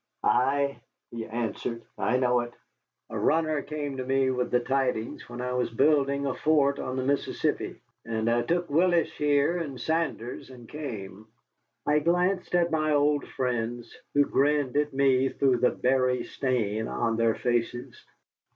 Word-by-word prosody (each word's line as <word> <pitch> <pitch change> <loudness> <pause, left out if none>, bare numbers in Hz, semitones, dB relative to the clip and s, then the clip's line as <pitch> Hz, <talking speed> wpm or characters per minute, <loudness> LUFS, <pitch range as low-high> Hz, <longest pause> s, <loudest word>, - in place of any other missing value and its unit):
"Ay," 140 +3 +2 0.3
he 115 -1 -5
answered, 115 0 -3
"I 125 - +1
know 125 -1 +2
it. 120 0 -5 0.6
A - - -3
runner 155 -2 +2
came 145 -2 -5
to 130 - -2
me 135 0 +1
with 125 -1 -1
the 125 - +3
tidings, 125 -3 -2
where 120 +1 -6
I 125 - -2
was 125 0 0
building 140 +2 +2
a 135 - 0
fort 140 -2 +2
on 130 - -3
the 130 - -1
Mississippi, 140 +2 -1 0.2
and 110 -1 -2
I 120 +1 +3
took 175 +5 0
Willis 170 +3 +2
here 145 +3 +2
and 140 -6 -5
Saunders, 155 -4 -2
and 125 -3 -12
came." 110 -9 -7 0.6
I 150 +1 +3
glanced 180 +4 +1
at 175 -1 +2
my 155 -1 +1
old 145 0 +2
friends, 120 -2 -3 0.2
who 145 0 +5
grinned 145 -2 +1
at 150 0 +1
me 135 -1 +3
through 130 -2 +2
the 125 +1 +3
berry 130 -1 +1
stain 110 -5 -1
on 115 -1 -1
their 115 0 +2
faces. 120 0 -2
130 Hz, 160 wpm, -27 LUFS, 120-145 Hz, 0.6 s, who